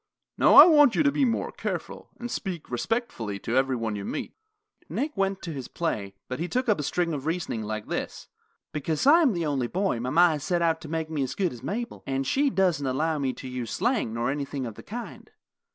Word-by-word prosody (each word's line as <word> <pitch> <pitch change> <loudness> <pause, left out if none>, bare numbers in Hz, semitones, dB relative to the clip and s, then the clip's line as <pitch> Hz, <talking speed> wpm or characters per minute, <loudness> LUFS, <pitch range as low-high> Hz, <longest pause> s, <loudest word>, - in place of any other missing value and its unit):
Now - - +5
I - - +13
want 295 -7 +6
you - - +3
to 290 - +4
be 280 -1 +2
more 230 -2 -1
careful, - - -5
and 240 0 -5
speak 180 -8 -5
respectfully 120 - -2
to 115 +5 -3
every 130 0 +2
one 115 -3 -2
you 100 - -5
meet." - - -4 0.6
Nick 295 +2 -2
went 195 -1 -1
to 165 - -4
his 135 -4 -6
play, 100 -12 -3
but 125 - -5
he 170 - -2
took 250 +6 -1
up 210 -7 +2
a - - 0
string 170 +3 -1
of 145 0 -4
reasoning 165 -9 -2
like 110 0 -4
this: - - -4 0.5
"Because 155 - -1
I 320 +5 +7
am 275 -9 +4
the 170 -2 -2
only 135 -5 0
boy 185 - -1
mama 150 +9 +4
has 150 -3 -2
set 175 -2 0
out 165 -1 +1
to - - -8
make 160 0 -3
me 150 -3 -1
as 130 - -2
good 185 -6 0
as 120 - -11
Mabel, 230 - -4
and 135 0 -1
she 280 - +2
doesn't 180 - +1
allow 155 +4 0
me 135 -2 0
to - - -9
use 125 -2 -5
slang 240 - 0
nor 115 +3 -1
anything 140 -2 -3
of 115 - -5
the - - -11
kind. 235 +2 -8
160 Hz, 230 wpm, -26 LUFS, 130-195 Hz, 0.6 s, I